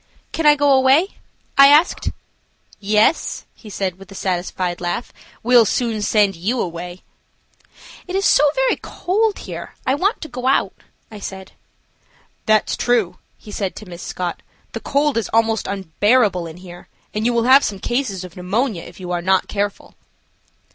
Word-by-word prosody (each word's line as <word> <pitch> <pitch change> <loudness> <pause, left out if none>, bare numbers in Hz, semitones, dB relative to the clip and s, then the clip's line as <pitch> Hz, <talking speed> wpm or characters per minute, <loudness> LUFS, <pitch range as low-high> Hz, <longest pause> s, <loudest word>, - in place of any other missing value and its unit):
"Can 320 -2 0
I 295 - +7
go 285 -1 +3
away?" 270 +8 +3 0.4
I 275 - +10
asked. 300 +5 +4 0.7
"Yes," 210 +9 +1
he 220 - -14
said, 190 -2 -3
with 195 0 -14
a - - -10
satisfied 180 -1 -2
laugh, 175 +7 -3 0.3
"we'll 245 0 +6
soon 225 0 -1
send 205 -2 +2
you 210 +10 -2
away." 175 0 -5 1.0
"It 370 - -4
is 390 +1 +1
so 295 0 +5
very - - +2
cold 420 +4 -1
here, - - -8
I 260 - +2
want 390 - 0
to 315 - -6
go 250 -2 -5
out," 270 - +2 0.4
I 210 - -9
said. 190 -1 -8 1.0
"That's 215 0 +3
true," 225 -8 0 0.2
he 210 - -13
said 195 -2 -3
to 215 - -9
Miss 175 -2 -10
Scott. 180 -2 -4 0.3
"The - - -5
cold 285 -1 0
is 230 - -4
almost 225 -1 +2
unbearable 200 0 +1
in 160 +1 -10
here, 175 -1 -12 0.3
and 215 - -2
you - - +2
will 235 -1 +1
have 265 +3 +6
some 200 - -2
cases 220 -4 -2
of 180 -2 -11
pneumonia 195 +2 -1
if 175 +2 -13
you 180 -1 -6
are 175 -1 -1
not 190 +1 +2
careful." 205 -1 -3
215 Hz, 170 wpm, -20 LUFS, 185-265 Hz, 1.0 s, I